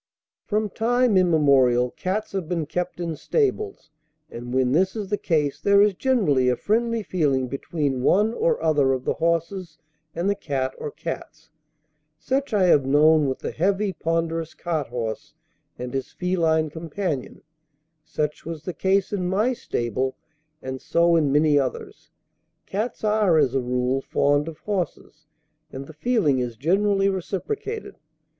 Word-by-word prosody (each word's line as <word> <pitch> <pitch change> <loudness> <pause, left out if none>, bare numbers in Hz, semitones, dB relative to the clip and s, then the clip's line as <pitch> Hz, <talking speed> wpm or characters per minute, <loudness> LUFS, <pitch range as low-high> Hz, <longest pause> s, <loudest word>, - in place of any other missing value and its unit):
From 215 0 0
time 240 +1 +2
immemorial 140 -9 +4
cats 195 +4 -3
have 190 -4 -4
been 170 -3 -1
kept 180 +3 -4
in 170 -2 -3
stables, 415 - -1 0.4
and 120 +1 -7
when 130 -1 +2
this 185 - +2
is 205 -3 -4
the 205 - +2
case 150 -5 0
there 200 0 +4
is 205 0 +5
generally 180 - +2
a 125 - +2
friendly 230 - 0
feeling 140 -9 0
between 140 0 -2
one 210 - +3
or 475 - +1
other 145 -4 +3
of 130 -1 -4
the - - +1
horses 170 0 -2 0.4
and 170 +3 -1
the 200 - +3
cat 135 -9 -3
or - - -4
cats. 160 0 -7 0.7
Such 265 - -2
I 205 -3 +3
have 160 -6 +5
known 150 +2 +4
with 130 - -2
the - - -5
heavy, 195 +3 0
ponderous 165 0 -2
cart 160 -5 -2
horse 115 -2 -5 0.4
and 125 +1 -6
his 135 -1 -3
feline 160 -4 0
companion; 160 -3 -4 0.6
such 150 -1 -3
was 160 -2 -7
the 180 - -4
case 190 +5 +1
in 185 -3 -1
my 210 +7 +1
stable, 130 - -2 0.5
and 130 0 -5
so 170 0 +3
in 150 -4 +2
many 150 0 +4
others. 130 -2 -5 0.6
Cats 215 +5 -4
are 210 -5 +3
as 140 -5 +3
a 135 - +1
rule 125 +2 0
fond 145 +2 +1
of 165 -2 -7
horses, 185 -6 -4 0.4
and 135 +1 -7
the 160 - -12
feeling 155 - +1
is 120 -2 -3
generally 195 - +2
reciprocated. 405 - -4
165 Hz, 155 wpm, -24 LUFS, 140-200 Hz, 0.7 s, is